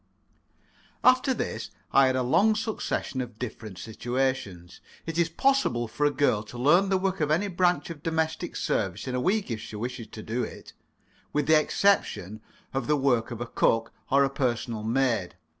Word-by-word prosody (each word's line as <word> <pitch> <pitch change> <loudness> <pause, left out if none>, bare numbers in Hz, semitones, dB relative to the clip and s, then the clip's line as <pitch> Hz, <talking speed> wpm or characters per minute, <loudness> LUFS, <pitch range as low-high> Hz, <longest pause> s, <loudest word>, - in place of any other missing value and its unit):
After 255 +1 +5
this 110 - -3 0.2
I 135 -1 +6
had 130 - +1
a 130 - +1
long 185 - +3
succession 215 - -2
of 120 -3 -7
different 110 -5 -7
situations. 115 -4 -3 0.2
It 165 0 -3
is 170 -1 +3
possible 165 - +1
for 145 +7 +1
a - - +1
girl 145 -7 +2
to 110 +3 -10
learn 175 +10 +4
the 190 - +3
work 190 -1 -1
of 150 - +1
any 170 +7 +2
branch 175 -4 +1
of 155 -3 -9
domestic 160 +2 -2
service 95 +3 -1
in 130 - -3
a 125 - 0
week, 195 - 0
if 110 -2 -3
she 110 - -8
wishes 120 +1 -5
to 110 0 -9
do 115 +3 -2
it, - - -9 0.6
with 150 -1 +1
the 155 +1 +6
exception 130 - +1 0.3
of 135 - -2
the 150 0 +3
work 125 -5 +2
of 120 -1 -6
a - - -1
cook 115 -1 +1 0.2
or 140 +1 +5
a 135 - +2
personal 120 -4 -1
maid. 115 -4 0
135 Hz, 185 wpm, -27 LUFS, 115-165 Hz, 0.6 s, I